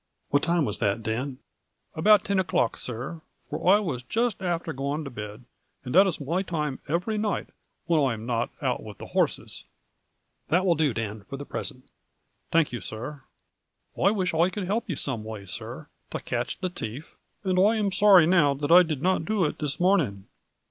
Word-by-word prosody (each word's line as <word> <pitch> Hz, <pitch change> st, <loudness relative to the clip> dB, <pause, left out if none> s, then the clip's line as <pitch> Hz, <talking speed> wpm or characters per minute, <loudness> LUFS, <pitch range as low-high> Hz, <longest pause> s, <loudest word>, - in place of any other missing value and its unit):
" -, -, -48 dB
What 145 Hz, -, +4 dB
time 170 Hz, -3 st, +2 dB
was 105 Hz, -4 st, -2 dB
that, 100 Hz, +1 st, 0 dB
Dan? 125 Hz, +4 st, -2 dB, 0.2 s
" -, -, -52 dB
" -, -, -50 dB
About 210 Hz, +6 st, +5 dB
tin 200 Hz, -1 st, +1 dB
o'clock, 160 Hz, -10 st, +1 dB
sir, 130 Hz, +7 st, -6 dB, 0.3 s
for 180 Hz, -, +1 dB
I 200 Hz, -, +7 dB
was 160 Hz, -, -3 dB
just 225 Hz, -, -1 dB
afther 170 Hz, -3 st, -2 dB
going 140 Hz, +3 st, -2 dB
to 140 Hz, -, -7 dB
bed, 105 Hz, +1 st, -8 dB, 0.4 s
and 125 Hz, -, -4 dB
that 190 Hz, +4 st, +7 dB
is 175 Hz, -3 st, -2 dB
my 165 Hz, +6 st, -1 dB
toime 150 Hz, -7 st, -3 dB
every 180 Hz, +8 st, -1 dB
night 210 Hz, -1 st, -1 dB, 0.4 s
whin 160 Hz, -3 st, +3 dB
I 130 Hz, -3 st, +2 dB
am 110 Hz, +1 st, -8 dB
not 120 Hz, -1 st, 0 dB
out -, -, 0 dB
with -, -, -10 dB
the -, -, -8 dB
horses." -, -, -1 dB, 0.4 s
" -, -, -49 dB
That 180 Hz, +5 st, +3 dB
will 180 Hz, -, +5 dB
do, 155 Hz, -3 st, +2 dB
Dan, 110 Hz, -2 st, -3 dB
for 135 Hz, -, -5 dB
the 145 Hz, -, -7 dB
present." 130 Hz, -2 st, -5 dB, 0.3 s
" -, -, -45 dB
Thank 165 Hz, -5 st, +3 dB
you, 120 Hz, -, -4 dB
sir. 130 Hz, +6 st, -6 dB, 0.7 s
I 195 Hz, -, +3 dB
wish 185 Hz, -4 st, 0 dB
I 165 Hz, +3 st, +3 dB
could 195 Hz, 0 st, -4 dB
help 215 Hz, +4 st, -1 dB
you 170 Hz, -, -1 dB
some 130 Hz, -6 st, -3 dB
way, 110 Hz, -2 st, -7 dB
sir, 90 Hz, -, -7 dB, 0.2 s
to -, -, -4 dB
catch -, -, -3 dB
the 185 Hz, -2 st, -3 dB
thief, 130 Hz, -1 st, -7 dB, 0.3 s
and 185 Hz, -2 st, +1 dB
I 210 Hz, +4 st, +5 dB
am 210 Hz, -3 st, 0 dB
sorry 190 Hz, -3 st, +7 dB
now 160 Hz, -5 st, +4 dB
that 145 Hz, +3 st, -2 dB
I 180 Hz, +1 st, +10 dB
did 155 Hz, -5 st, -2 dB
not 185 Hz, -2 st, +2 dB
do 210 Hz, -3 st, +1 dB
it 150 Hz, -, -3 dB
this 145 Hz, -2 st, -2 dB
morning." 165 Hz, -, +2 dB
160 Hz, 210 wpm, -26 LUFS, 130-185 Hz, 0.7 s, I